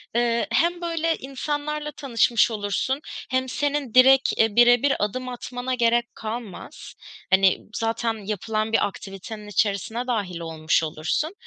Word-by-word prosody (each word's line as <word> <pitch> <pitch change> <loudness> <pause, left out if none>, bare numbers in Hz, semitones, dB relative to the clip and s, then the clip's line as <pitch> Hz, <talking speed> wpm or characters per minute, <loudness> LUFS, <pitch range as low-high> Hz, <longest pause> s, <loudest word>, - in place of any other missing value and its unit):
Eee, 235 -1 +1
hem 340 +8 +1
böyle 330 -1 0
insanlarla 295 +3 -4
tanışmış 240 -5 +2
olursun, 215 +6 -1 0.3
hem 260 0 0
senin 285 -3 -2
direkt, 265 +1 +7 0.2
eee, 225 -2 +2
birebir 245 +3 +5
adım 255 +5 -2
atmana 245 +1 -5
gerek 235 0 +1
kalmaz. 220 -3 -7 0.4
Hani, 190 0 +5
m - - -20
zaten 225 +1 -1
yapılan 215 +1 -2
bir 205 - +3
aktivitenin 205 +2 -9
içerisine 210 +4 -1
dâhil 200 -8 -2
olmuş 160 -1 0
olursun, 160 - -2
235 Hz, 130 wpm, -24 LUFS, 210-265 Hz, 0.4 s, direkt